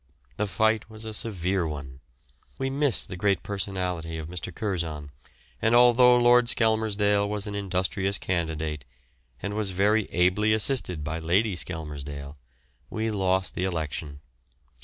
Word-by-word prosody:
The 105 - 0
fight 110 +2 +1
was 110 0 -9
a 110 - -5
severe 95 -5 -1
one. 70 -4 -7 0.6
We 135 0 -2
missed 140 -4 +1
the - - -6
great 100 0 +1
personality 90 -5 -3
of 80 -1 -6
Mr. 90 +1 -5
Curzon, 80 -7 -3 0.5
and 115 +2 +3
although 125 0 +6
Lord 120 0 +5
Skelmersdale 105 -3 +2
was 105 -1 -3
an 105 - -5
industrious 95 0 0
candidate, 80 -5 -2 0.6
and 100 - -3
was 105 -1 0
very 100 +3 +2
ably 95 +5 +3
assisted 110 - +2
by 80 +3 -3
Lady 95 +5 +1
Skelmersdale, 75 -4 -4 0.5
we 110 +1 -2
lost 95 -2 0
the 90 - -2
election. 75 -4 -4
95 Hz, 135 wpm, -26 LUFS, 80-110 Hz, 0.6 s, although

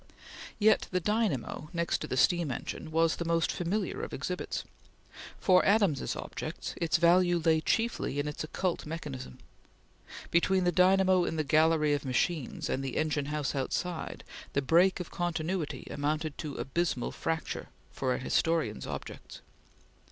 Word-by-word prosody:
Yet 215 0 +4
the 180 - 0
dynamo, 185 - -1
next 170 0 0
to - - -5
the 130 - -2
steam 170 +3 +3
engine, 130 +4 -5
was 165 +1 +2
the - - -2
most 165 -1 +1
familiar 180 +5 -2
of - - -5
exhibits. - - -3 0.8
For 185 -1 +5
Adams's 200 - +2
objects - - -5
its 170 -1 +2
value 175 +1 +4
lay 160 -1 +2
chiefly 225 - 0
in 145 - -1
its 150 - -4
occult 170 +1 -2
mechanism. 145 - -6 0.9
Between 185 +2 +3
the 175 - +3
dynamo 185 +1 +4
in 165 - -2
the 155 - 0
gallery 155 +1 +3
of 145 - -1
machines 135 +2 -1
and 135 - -1
the 135 - -3
engine 150 -2 0
house 150 -1 -2
outside, 160 +5 -3 0.3
the 140 - +2
break 175 +8 +4
of 180 - -6
continuity 165 -4 -2
amounted 150 +1 -1
to 150 -4 -5
abysmal 135 -2 -1
fracture 160 0 -3 0.2
for 130 -2 -1
a - - -2
historian's 160 -3 0
objects. - - -7
165 Hz, 150 wpm, -30 LUFS, 145-175 Hz, 0.9 s, For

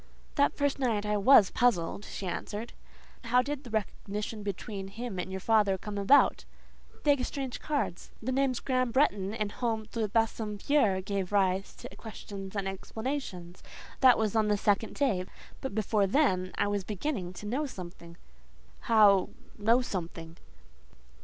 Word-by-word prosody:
"That 285 -1 +2
first 285 -1 0
night 225 -6 0
I 210 0 +1
was 205 -1 +6
puzzled," 205 -5 +1
she 195 - -6
answered. 210 +5 -4 0.5
"How 250 +2 +4
did 285 +1 -4
the 245 - -10
recognition 210 0 -3
between 200 0 -5
him 205 -1 -6
and 180 - -3
your 190 0 -4
father 205 -2 +3
come 210 +2 -7
about?" 205 +9 +5 0.6
"They 290 - +5
exchanged 265 -1 -4
cards. 285 - -2
The 245 +4 -3
names 265 -1 +1
Graham 255 -2 0
Bretton 205 -7 +2
and 210 -2 -2
Home 225 -2 -2
de 225 -3 -1
Bassompierre 220 0 +1
gave 195 -1 -3
rise 195 -1 +1
to 195 - -10
questions 200 -3 -8
and 200 -1 -1
explanations. 195 -3 -5 0.4
That 255 -2 +7
was 220 -1 0
on 220 -1 +3
the 210 0 +2
second 205 +2 +1
day; 220 -11 +1 0.4
but 265 -6 -4
before 210 -1 +2
then 185 -7 +2
I - - +2
was 205 -1 -1
beginning 205 -2 -3
to 210 - -9
know 265 +8 -1
something." 175 -6 -10 0.6
"How—know 215 +2 +3
something?" 165 -5 -6
210 Hz, 150 wpm, -30 LUFS, 195-245 Hz, 0.6 s, That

